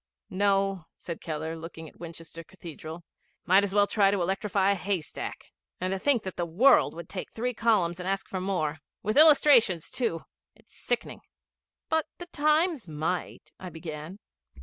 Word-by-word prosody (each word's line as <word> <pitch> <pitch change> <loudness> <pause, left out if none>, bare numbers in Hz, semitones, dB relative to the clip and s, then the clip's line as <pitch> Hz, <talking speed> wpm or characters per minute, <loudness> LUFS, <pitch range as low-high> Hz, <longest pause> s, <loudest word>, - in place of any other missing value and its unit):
'No,' 195 -2 +1
said 170 -2 -7
Keller, 160 0 -4
looking 160 0 -9
at - - -17
Winchester 165 0 -9
Cathedral. 165 -1 -10 0.4
''Might 190 +2 +6
as 200 0 -2
well 205 0 +5
try 200 -1 +3
to 200 0 0
electrify 195 +2 +1
a - - +4
haystack. 190 -4 -4 0.3
And 185 +1 -2
to 195 - -2
think 260 -1 +2
that 190 - -6
the 175 - -1
World 235 +9 +4
would 170 -1 -8
take 190 - -6
three 250 +2 -2
columns 200 -7 +1
and 180 +1 -3
ask 195 0 -2
for 185 - -4
more 160 -6 -1 0.2
with 215 +2 -1
illustrations 280 - +5
too! 230 -10 -1 0.3
It's - - -23
sickening.' - - -3 0.7
'But 320 -1 +1
the 350 - -7
Times 305 - +1
might,' 160 +3 -4
I 185 - -7
began. 160 +2 -8
190 Hz, 165 wpm, -28 LUFS, 165-210 Hz, 0.7 s, Might